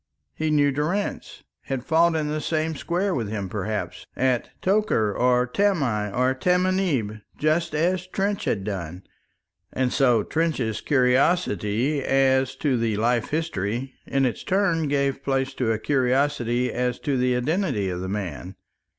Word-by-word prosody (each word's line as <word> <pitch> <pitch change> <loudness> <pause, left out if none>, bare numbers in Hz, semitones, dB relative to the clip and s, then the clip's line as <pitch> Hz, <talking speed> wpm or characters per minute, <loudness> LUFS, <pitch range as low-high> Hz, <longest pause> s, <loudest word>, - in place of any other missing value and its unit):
He 155 0 -2
knew 145 -2 +3
Durrance, 160 +9 -3 0.2
had 135 -2 -3
fought 165 0 +3
in 155 -1 0
the 155 +1 -2
same 160 +1 -1
square 180 +6 -1
with 115 -8 -2
him, 100 -3 -3
perhaps, 95 -3 -4
at 130 -2 0
Tokar, 185 - +1
or 125 0 +3
Tamai, 125 - 0
or 125 +4 +1
Tamanieb, 180 - 0 0.2
just 155 +2 0
as 180 +3 0
Trench 200 +2 -1
had 100 - -1
done! 95 -3 -5 0.7
And 130 -1 0
so 125 -6 +3
Trench's 135 -9 -1
curiosity 130 - +2
as 130 -1 +2
to 140 -5 0
the 115 -3 0
life 120 +1 +1
history 130 - -2
in 135 0 +1
its 125 - -2
turn 175 -5 +1
gave 140 -1 0
place 135 -1 0
to 120 -4 0
a 110 - +1
curiosity 125 -1 +1
as 125 0 -1
to 140 - -1
the 125 0 +2
identity 135 - 0
of 90 - -4
the 95 - -4
man. 95 -1 -5
130 Hz, 150 wpm, -24 LUFS, 115-160 Hz, 0.7 s, knew